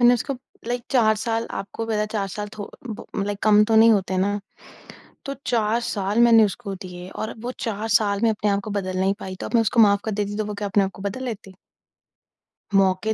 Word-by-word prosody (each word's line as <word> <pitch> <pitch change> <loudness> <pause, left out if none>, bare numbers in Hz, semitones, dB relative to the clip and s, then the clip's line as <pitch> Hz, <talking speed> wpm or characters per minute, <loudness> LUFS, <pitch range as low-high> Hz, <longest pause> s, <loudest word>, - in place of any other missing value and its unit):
मैंने 245 0 +7
उसको 275 +4 -2 0.3
लाइक 245 0 -1
4 225 -5 +4
साल 225 +1 -1
आपको 215 +3 -6
पता 220 -1 -1
है, 210 - +1
4 205 -2 -2
साल 205 +2 -5
थो 205 - -6 0.2
ब 215 - -6 0.2
लाइक 205 -1 -3
कम 210 -1 +6
तो 220 0 +2
नहीं 225 +1 +7
होते 190 -2 0
ना, 205 +2 0 0.8
तो 275 0 -4
4 225 0 +1
साल 205 +3 0
मैंने 230 -2 +7
उसको 200 -1 -3
दिए 180 -1 -9
और 220 - -5
वो 245 +2 -4
4 220 0 -3
साल 200 -2 -1
में 230 - +4
अपने 210 -1 0
आप 200 0 +1
को 215 - -5
बदल 185 -2 -2
नहीं 195 +1 +2
पाई, 185 0 -6
तो - - -6
अब - - -8
मैं 230 - +5
उसको 225 +2 +2
माफ़ 200 -2 +5
कर 220 - -1
देती 205 0 -2
तो 215 - -1
वो 210 0 -5
क्या 205 0 -3
अपने 195 0 +3
आप 190 - -3
को 195 - -10
बदल 230 +6 -4
लेती? 205 -5 -6 1.2
मौके 195 +2 +3
210 Hz, 235 wpm, -23 LUFS, 200-225 Hz, 1.2 s, मैंने